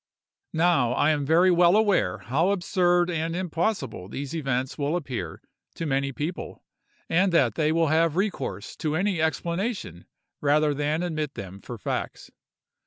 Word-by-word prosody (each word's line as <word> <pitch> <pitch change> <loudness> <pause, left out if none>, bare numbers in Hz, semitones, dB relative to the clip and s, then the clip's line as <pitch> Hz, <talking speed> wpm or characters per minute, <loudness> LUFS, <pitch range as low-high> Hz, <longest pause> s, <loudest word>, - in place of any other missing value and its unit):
Now, 160 -8 +3
I 145 - +3
am 145 -2 -1
very 175 +4 +5
well 175 +1 +5
aware 205 - +2
how 130 - 0
absurd 175 -2 +2
and 165 0 -2
impossible 175 - -2
these 140 +6 -5
events 135 -4 -1
will 145 +2 -1
appear 125 - -5 0.3
to 165 - -4
many 140 -1 0
people, 155 +6 -5 0.4
and 185 +3 +2
that 130 -9 +4
they 155 +5 +1
will 165 -1 +2
have 160 0 +2
recourse 195 +2 -2
to 155 -2 -1
any 185 -1 0
explanation 170 - -2 0.3
rather 150 +1 +3
than 150 +4 -1
admit 155 -4 -3
them 100 0 -8
for 120 - -8
facts. - - -4
160 Hz, 150 wpm, -26 LUFS, 140-175 Hz, 0.4 s, very